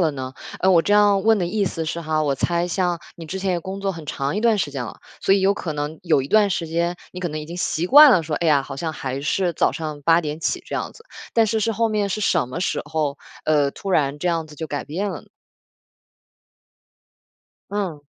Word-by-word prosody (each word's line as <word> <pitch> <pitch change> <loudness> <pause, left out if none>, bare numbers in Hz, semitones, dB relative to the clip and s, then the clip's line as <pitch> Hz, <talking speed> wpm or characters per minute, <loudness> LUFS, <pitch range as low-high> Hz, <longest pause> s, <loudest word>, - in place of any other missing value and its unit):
了 160 -3 +2
呢？ 130 -1 -6 0.3
嗯， 190 - +4
我 170 -2 +5
这 205 - 0
样 205 -1 +4
问 225 0 +5
的 175 - 0
意 205 +2 0
思 165 -3 -3
是 165 +2 -3
哈， 155 -1 0
我 140 -2 0
猜 170 +5 0
像 175 -1 0 0.2
你 165 - -9
之 190 +5 -5
前 190 0 0
也 180 - +1
工 190 +3 -6
作 195 0 0
很 165 -5 -8
长 140 +3 -2
一 - - 0
段 230 -1 +3
时 155 -6 -1
间 135 -3 -4
了， - - -9 0.2
所 195 - +4
以 200 - +2
有 195 +1 +4
可 175 -5 -4
能 150 +1 -4
有 155 -6 +3
一 135 - -7
段 210 +2 +4
时 170 -4 -2
间 170 +2 -1
你 180 - -8
可 180 - -2
能 155 -2 -4
已 - - -7
经 170 +2 -7
习 175 -1 -1
惯 290 +2 +9
了 175 - +4
说， 155 -1 -3
“哎 170 - -1
呀， 145 -3 +4
好 135 0 -8
像 160 +2 -3
还 135 -2 -4
是 175 +5 0
早 - - +1
上 155 -2 -5
8 165 +3 +4
点 150 -2 -4
起 340 - -2
这 - - -4
样 - - -4
子“， 455 - -17 0.3
但 230 - +5
是 220 +1 0
是 225 +1 0
后 230 +1 +1
面 210 -2 0
是 215 - -2
什 175 -8 +2
么 130 +8 -5
时 185 - -1
候， 150 -1 -2 0.3
呃， 145 -2 +2
突 195 - -6
然 145 -4 +1
这 180 - 0
样 165 -2 -1
子 155 - -13
就 160 +2 -6
改 145 - -3
变 190 +7 -3
了 - - -6
呢？ - - -22 2.4
嗯。 190 -8 -3
170 Hz, 270 characters per minute, -22 LUFS, 150-195 Hz, 2.4 s, 惯